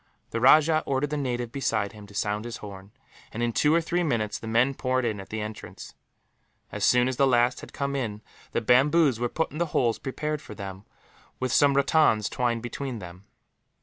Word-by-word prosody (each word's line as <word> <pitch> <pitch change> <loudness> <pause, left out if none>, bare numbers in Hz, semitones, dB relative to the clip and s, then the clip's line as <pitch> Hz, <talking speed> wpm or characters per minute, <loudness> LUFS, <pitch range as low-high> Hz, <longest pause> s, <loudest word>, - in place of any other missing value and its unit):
The 115 - -2
rajah 155 +4 +6
ordered 140 +2 0
the - - -1
native 125 -4 -2
beside 110 -7 -1
him 105 -2 -12
to 100 - -15
sound 105 +2 -1
his 120 -2 -5
horn 100 -1 -10 0.4
and, 115 +2 -3
in 120 -1 0
two 150 - +3
or 165 +1 +4
three 175 +2 -1
minutes, 115 -10 -1
the 110 - -8
men 120 +5 +2
poured 130 -1 -1
in 110 -3 -2
at 95 - -10
the 110 0 -4
entrance. 105 0 -8 0.8
As 105 - -4
soon 125 +4 +4
as 130 -1 -2
the 140 - +4
last 120 0 +2
had - - -11
come 140 0 -3
in, 110 -5 -3 0.3
the - - -1
bamboos 135 0 +4
were 120 0 -1
put 160 +5 -2
in 155 - -7
the 170 - +1
holes 115 -4 +1
prepared 150 +2 -3
for 105 - -10
them, 100 0 -8 0.5
with 130 -1 -1
some 140 -1 +4
rattans 140 -7 +3
twined 120 -2 -1
between 130 +1 -5
them. 90 0 -11
120 Hz, 210 wpm, -26 LUFS, 110-140 Hz, 0.8 s, rajah